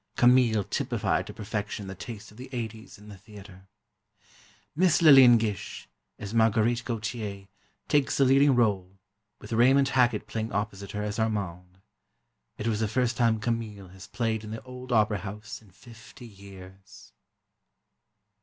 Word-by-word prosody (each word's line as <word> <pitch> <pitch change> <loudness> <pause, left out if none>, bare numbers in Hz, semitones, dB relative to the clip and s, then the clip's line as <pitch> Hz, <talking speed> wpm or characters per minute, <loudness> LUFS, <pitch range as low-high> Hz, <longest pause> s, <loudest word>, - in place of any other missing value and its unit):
"Camille" 120 -4 +4
typified 100 - -2
to - - -8
perfection 105 -1 -5
the 95 - -7
taste 105 +3 -9
of 105 - -18
the 130 +2 -10
'80s 115 -3 -7
in 105 +1 -16
the 105 -2 -11
theatre. 100 -2 -14 1.1
Miss 175 0 +3
Lillian 135 -7 +8
Gish, 105 -4 -4 0.3
as 105 +1 -7
Marguerite 115 +1 +2
Gautier, 110 -4 -5 0.4
takes 145 -2 +1
the 135 - +4
leading 135 +1 +4
rôle, 100 -5 0 0.4
with 105 - -9
Raymond 135 +4 +4
Hackett 120 -5 +2
playing 110 0 -4
opposite 100 -1 -4
her 105 0 -3
as 105 +2 -4
Armand. 95 -4 -3 0.8
It 105 - -6
was 110 -2 0
the 110 - 0
first 120 +2 0
time 115 -1 +2
"Camille" 105 -4 -4
has 95 0 -13
played 115 -2 -2
in 105 - -8
the 110 +1 -7
old 125 0 -10
opera 105 -3 +2
house 105 +1 -8
in 105 - -20
fifty 115 +5 -15
years. 95 -2 -14
110 Hz, 150 wpm, -27 LUFS, 100-120 Hz, 1.1 s, Lillian